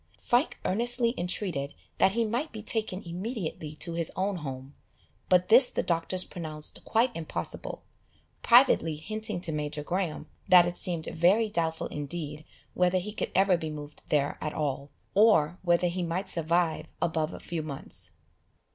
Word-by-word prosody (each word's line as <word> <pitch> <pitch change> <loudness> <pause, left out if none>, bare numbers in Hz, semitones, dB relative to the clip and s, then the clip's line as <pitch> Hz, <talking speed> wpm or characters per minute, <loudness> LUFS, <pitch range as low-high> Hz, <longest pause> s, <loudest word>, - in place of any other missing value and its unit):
Frank 245 +5 +1
earnestly 235 +3 +1
entreated 175 -5 -3 0.2
that 190 - +5
he 230 +1 +1
might 240 +8 -2
be 215 -2 -7
taken 215 -3 -2
immediately 175 - -5
to 170 +2 -3
his 165 -1 -1
own 195 +1 -1
home, 135 -3 -7 0.6
but 180 0 +4
this 245 +3 +7
the - - -1
doctors 175 +2 0
pronounced 155 -3 -4
quite 235 +2 +1
impossible, 155 - -4 0.6
privately 160 -1 +5
hinting 215 +4 -4
to 170 - -1
Major 150 0 -3
Graham 175 0 -2 0.2
that 180 -2 +8
it 175 0 -3
seemed 170 -3 -1
very 195 +7 +3
doubtful 165 -4 -1
indeed 150 0 -5 0.3
whether 180 0 +2
he 200 +3 -3
could - - -3
ever 190 -2 +4
be 160 -2 -4
moved 150 -1 -8
there 145 -1 +1
at 150 - -3
all, 140 -1 -2 0.2
or 190 -6 +4
whether 175 0 +2
he 180 +1 -2
might 175 +3 -2
survive 170 -1 +1
above 160 -1 0
a - - -8
few 170 -2 -4
months. 145 -3 -6
175 Hz, 155 wpm, -28 LUFS, 155-195 Hz, 0.6 s, that